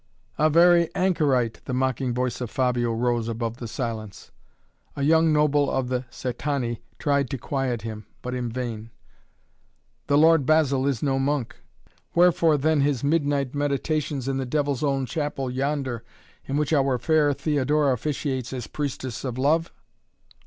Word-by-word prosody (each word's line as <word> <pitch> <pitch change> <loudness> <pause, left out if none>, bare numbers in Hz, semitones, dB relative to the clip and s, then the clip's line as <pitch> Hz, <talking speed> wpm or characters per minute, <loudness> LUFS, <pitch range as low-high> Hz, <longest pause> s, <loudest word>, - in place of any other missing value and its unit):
"A 155 +1 +4
very 170 +1 +5
anchorite," 150 - +1
the 130 - -3
mocking 130 0 0
voice 125 0 -2
of 120 - -3
Fabio 125 -2 0
rose 120 0 0
above 115 0 -3
the 120 - -6
silence. 110 -4 -5 0.6
A 140 - -3
young 160 +2 +4
noble 150 -1 +3
of 130 -2 -1
the 125 0 -2
Cætani 125 -2 -3 0.2
tried 140 -3 +1
to 135 - -3
quiet 130 -3 -2
him, 110 -2 -7 0.2
but 125 - -4
in 125 -1 -2
vain: 115 -2 -5 1.2
"The 145 - +3
Lord 160 0 +5
Basil 140 -2 +2
is 135 -5 -1
no 135 -2 +1
monk." 135 -3 -1 0.6
"Wherefore 170 -3 +4
then 155 +1 +2
his 140 -3 0
midnight 145 -3 +1
meditations 145 -1 -1
in 135 -1 -1
the 135 - -2
devil's 145 0 -1
own 135 -2 +1
chapel 135 0 -3
yonder, 130 -3 -2 0.4
in 140 - -2
which 150 +1 0
our 135 -3 +2
fair 150 +4 +2
Theodora 145 0 +1
officiates 130 -1 -3
as 125 -4 -4
Priestess 130 -4 -4
of 125 -2 -4
Love?" 155 +5 +1
135 Hz, 150 wpm, -25 LUFS, 125-150 Hz, 1.2 s, very